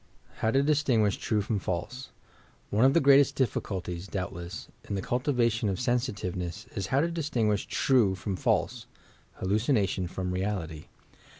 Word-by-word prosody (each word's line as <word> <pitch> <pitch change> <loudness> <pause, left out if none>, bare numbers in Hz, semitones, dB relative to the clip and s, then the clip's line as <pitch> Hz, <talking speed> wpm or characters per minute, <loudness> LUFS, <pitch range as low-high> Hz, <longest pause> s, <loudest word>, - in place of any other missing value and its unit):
HOW 110 - +1
TO 135 +4 +3
DISTINCUTSH 135 -9 +2
TRUE 105 -2 0
FROM 105 0 -1
FALSE 95 +9 -4 0.6
One 110 +5 +4
of 135 - +4
the - - +7
greatest 140 -1 +5
difBeuIties, 95 -7 -2
doubtless, 85 -3 -5 0.2
in 100 - -1
the 95 - -2
cul 125 - 0
tivation 120 -5 +1
of 95 - -2
sensitiveness, 105 - -2
is 100 -3 -2
how 135 +6 +2
to 170 +2 0
distinguish 120 -11 0
true 115 -8 +3
from 95 +1 -3
false - - 0 0.2
— - - -32
hallucination 100 -2 +1
from 90 +1 -4
reality. 90 -5 -3
105 Hz, 155 wpm, -28 LUFS, 95-130 Hz, 0.6 s, the